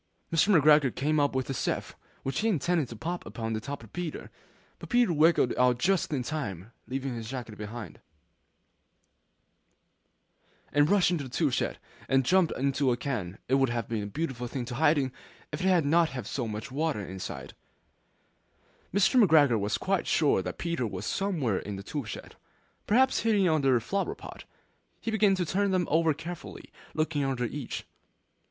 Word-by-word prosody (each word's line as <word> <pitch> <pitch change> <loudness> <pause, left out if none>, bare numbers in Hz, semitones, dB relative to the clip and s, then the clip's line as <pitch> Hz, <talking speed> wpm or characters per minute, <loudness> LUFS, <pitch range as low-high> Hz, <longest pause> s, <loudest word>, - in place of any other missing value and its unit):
Mr. 170 +2 +5
McGregor 150 -3 +5
came 150 +2 +1
up 145 -2 +1
with 130 -1 -1
a 135 - -2
sieve, - - -2 0.3
which 135 - -2
he 220 - +1
intended 170 - +1
to 115 - -7
pop 175 +10 -4
upon 115 -2 -4
the 110 - -1
top 140 +2 -6
of 110 - -15
Peter; 175 -3 -5 0.5
but - - -10
Peter 240 -5 +3
wriggled 155 -4 +4
out 125 -1 +4
just 180 +7 +1
in 135 -4 -1
time, 115 - -5 0.2
leaving 135 0 -3
his 115 -2 -6
jacket 120 -4 -6
behind 105 -3 -7
him. - - -28 2.7
And 145 +2 +4
rushed 200 -3 +4
into 160 -6 -1
the - - -8
tool 120 - +1
shed, - - -1 0.3
and 135 -1 +3
jumped 185 +2 +4
into 135 0 +1
a 120 - 0
can. 105 -10 -3
It 130 - -1
would 135 - +3
have 115 -1 -2
been 115 -2 -2
a 100 - -4
beautiful 130 0 -3
thing 125 0 -4
to 125 - -6
hide 150 +4 +3
in, 135 -2 0 0.4
if 150 - -4
it 185 - +1
had 180 -5 +4
not 165 +2 +4
had 125 -3 -6
so 125 -4 -3
much 105 +2 -5
water 145 -7 -1
in 95 - -7
it. 95 - -7 1.4
Mr. 210 +5 +4
McGregor 145 - +5
was 100 +1 0
quite 195 -1 -1
sure 145 -11 +3
that - - -5
Peter 170 -8 -1
was 95 -1 -5
somewhere 160 - 0
in 100 0 -6
the 95 - -7
tool 145 +4 -4
shed, - - -8 0.5
perhaps 260 +5 +4
hidden 210 -4 +3
underneath 135 -7 +3
a - - -16
flower 200 +6 -1
pot. - - -10 0.5
He 225 - -3
began 210 -3 +4
to 180 -1 -1
turn 200 +5 +1
them 185 -2 +1
over 160 -1 +3
carefully, 170 +3 -8 0.2
looking 155 -2 0
under 130 -3 -1
each. 135 +2 -5
140 Hz, 185 wpm, -28 LUFS, 120-170 Hz, 2.7 s, Mr